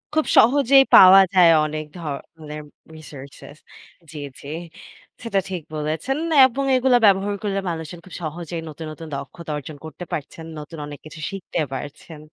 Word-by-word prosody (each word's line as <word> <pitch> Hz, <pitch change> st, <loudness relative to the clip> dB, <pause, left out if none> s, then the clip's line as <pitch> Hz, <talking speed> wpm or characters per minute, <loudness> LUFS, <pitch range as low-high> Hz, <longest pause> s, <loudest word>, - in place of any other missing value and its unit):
খুব 315 Hz, -, +2 dB
সহজেই 270 Hz, +2 st, +6 dB
পাওয়া 190 Hz, +1 st, +9 dB
যায় 180 Hz, -3 st, +6 dB, 0.2 s
অনেক 155 Hz, 0 st, -4 dB
ধরনের 150 Hz, 0 st, -8 dB, 0.3 s
researches। 145 Hz, -1 st, -12 dB, 0.5 s
জি, 155 Hz, -, -10 dB, 0.2 s
জি। -, -, -11 dB, 0.8 s
সেটা 210 Hz, -4 st, 0 dB
ঠিক 185 Hz, -3 st, -4 dB
বলেছেন 155 Hz, -, -2 dB, 0.3 s
এবং 260 Hz, +2 st, -2 dB
এগুলো 255 Hz, 0 st, +3 dB
ব্যবহার 200 Hz, 0 st, +3 dB
করলে 200 Hz, -1 st, -1 dB
মানুষজন 165 Hz, 0 st, -6 dB
খুব 185 Hz, -, -14 dB
সহজেই 165 Hz, +1 st, -5 dB
নতুন 160 Hz, +1 st, -9 dB
নতুন 160 Hz, +1 st, -10 dB
দক্ষতা 155 Hz, +4 st, -8 dB
অর্জন 145 Hz, +1 st, -9 dB
করতে 160 Hz, +3 st, -9 dB
পারছেন। 160 Hz, +2 st, -6 dB
নতুন 150 Hz, +2 st, -10 dB
অনেক 145 Hz, -1 st, -9 dB
কিছু 155 Hz, +1 st, -11 dB
শিখতে 195 Hz, -3 st, -5 dB
পারছেন। 145 Hz, +4 st, -8 dB
165 Hz, 145 wpm, -22 LUFS, 150-195 Hz, 0.8 s, পাওয়া